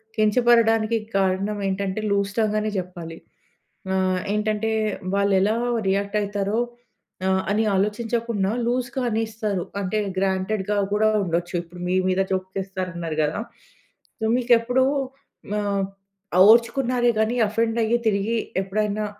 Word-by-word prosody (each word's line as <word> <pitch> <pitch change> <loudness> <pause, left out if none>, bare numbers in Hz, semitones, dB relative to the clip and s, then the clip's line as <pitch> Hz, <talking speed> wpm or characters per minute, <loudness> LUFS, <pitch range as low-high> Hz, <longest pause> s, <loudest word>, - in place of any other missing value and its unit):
కించపడడానికి 225 0 +3 0.2
కారణం 195 +2 0
ఏంటంటే 195 +1 -2
loose 200 0 +1
tongue 215 -1 +1
అనే 215 0 -1
చెప్పాలి. 175 -3 -7 0.8
ఆహ్, 185 -1 +1 0.2
ఏంటంటే 215 +1 0 0.4
వాళ్ళు 200 0 +2
ఎలా 205 +3 +2 0.3
రియాక్ట్ 200 +2 0
అయితారో 205 +1 -1 0.7
ఆహ్, 190 0 +2
అని 215 +2 +2
ఆలోచించకుండా 215 0 0 0.2
లూజ్‌గా 245 +1 -1
అనేస్తారు. 215 -4 -2 0.2
అంటే 195 +2 -1 0.2
గ్రాంటెడ్‌గా 190 +2 0 0.2
కూడా 215 +1 +3 0.2
ఉండొచ్చు. 175 +1 -2
ఇప్పుడు 175 +1 -13
మీ 180 - +1
మీద 185 +1 +1
జోక్ 185 0 -1
చేస్తారు 190 -1 -4
అన్నారు 165 -2 -4
కదా! 150 +4 -1 0.8
సో, 220 - -3
మీకు 250 -1 +1
ఎప్పుడు 250 +3 +2 0.7
ఆహ్, 200 -1 0 0.7
ఓర్చుకున్నారే 240 +1 +3
గాని 220 +3 +1
ఆఫెండ్ 225 +2 0
అయ్యి 235 +2 +2
తిరిగి 210 +3 0 0.2
ఎప్పుడైనా 210 +2 -1
210 Hz, 120 wpm, -23 LUFS, 190-225 Hz, 0.8 s, కించపడడానికి